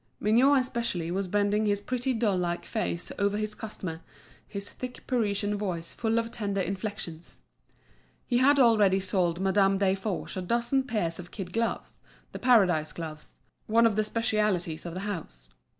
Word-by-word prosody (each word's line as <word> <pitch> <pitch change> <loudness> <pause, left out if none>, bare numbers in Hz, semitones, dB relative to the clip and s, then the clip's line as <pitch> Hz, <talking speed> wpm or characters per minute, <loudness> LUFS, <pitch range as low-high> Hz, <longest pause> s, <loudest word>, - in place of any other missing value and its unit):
Mignot 255 +7 +5
especially 235 -10 -2
was 190 +1 -1
bending 205 +2 +1
his 205 -1 +2
pretty 250 +4 -2
doll 220 -4 +1
like 175 -1 -2
face 195 -6 -2
over 200 0 +1
his 215 0 -2
customer, 185 -7 -6 0.5
his 200 -1 -4
thick 255 -1 -8
Parisian 210 -4 0
voice 180 -5 -3
full 225 0 0
of 230 0 -1
tender 200 -4 -2
inflections. 190 -4 -5 0.8
He 240 -1 +1
had 280 +3 +5
already 215 -7 +5
sold 185 -3 0
Madame 195 0 +3
Desforges 195 0 -1
a - - -1
dozen 240 +7 +1
pairs 185 -10 -1
of 175 0 -8
kid 185 -4 -7
gloves, 230 0 -2 0.3
the - - -7
Paradise 180 -11 +4
gloves, 155 -1 -7 0.3
one 230 +2 +4
of 225 -3 +3
the 215 - +2
specialities 210 -8 0
of 170 - -6
the 185 - -4
house. 155 - -6
205 Hz, 160 wpm, -28 LUFS, 180-230 Hz, 0.8 s, Mignot